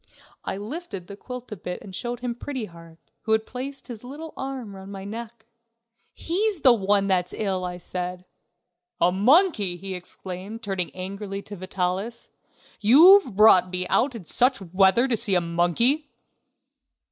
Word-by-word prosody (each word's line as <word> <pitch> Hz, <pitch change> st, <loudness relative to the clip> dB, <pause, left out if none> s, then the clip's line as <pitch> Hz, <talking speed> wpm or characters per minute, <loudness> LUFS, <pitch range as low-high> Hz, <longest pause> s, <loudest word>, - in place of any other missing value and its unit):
I -, -, -3 dB
lifted 215 Hz, -, -6 dB
the 200 Hz, -, -9 dB
quilt 250 Hz, +3 st, -9 dB
a -, -, -3 dB
bit 180 Hz, -1 st, -6 dB
and 195 Hz, -, -11 dB
showed 240 Hz, +2 st, -4 dB
him 245 Hz, -1 st, -2 dB
Pretty 255 Hz, 0 st, -5 dB
Heart, 165 Hz, -3 st, -14 dB, 0.2 s
who 220 Hz, -, 0 dB
had 220 Hz, 0 st, +2 dB
placed 270 Hz, +2 st, -6 dB
his 235 Hz, -3 st, -8 dB
little 300 Hz, +5 st, -8 dB
arm 260 Hz, -7 st, -6 dB
round 190 Hz, +1 st, -10 dB
my 195 Hz, -1 st, -7 dB
neck. 225 Hz, +2 st, -8 dB, 0.7 s
"He's 390 Hz, +1 st, -1 dB
the 255 Hz, -3 st, +7 dB
one 200 Hz, -2 st, +2 dB
that's 185 Hz, -2 st, 0 dB
ill," 190 Hz, -4 st, -2 dB
I 180 Hz, 0 st, -4 dB
said. 180 Hz, 0 st, -5 dB, 0.7 s
"A 175 Hz, -, +4 dB
monkey!" 210 Hz, -, +3 dB
he 190 Hz, +2 st, -6 dB
exclaimed, 185 Hz, +4 st, -8 dB
turning 190 Hz, -4 st, -2 dB
angrily 195 Hz, +2 st, -5 dB
to 205 Hz, -, -8 dB
Vitalis. 185 Hz, +5 st, -3 dB, 0.5 s
"You've 295 Hz, -, +7 dB
brought 190 Hz, -4 st, +6 dB
me 180 Hz, 0 st, -3 dB
out 255 Hz, +1 st, +2 dB
in 205 Hz, -7 st, -8 dB
such 255 Hz, -, +2 dB
weather 190 Hz, +6 st, +3 dB
to 250 Hz, -, +1 dB
see 215 Hz, -3 st, +1 dB
a -, -, +5 dB
monkey!..." 175 Hz, -, +1 dB
205 Hz, 160 wpm, -25 LUFS, 185-250 Hz, 0.7 s, the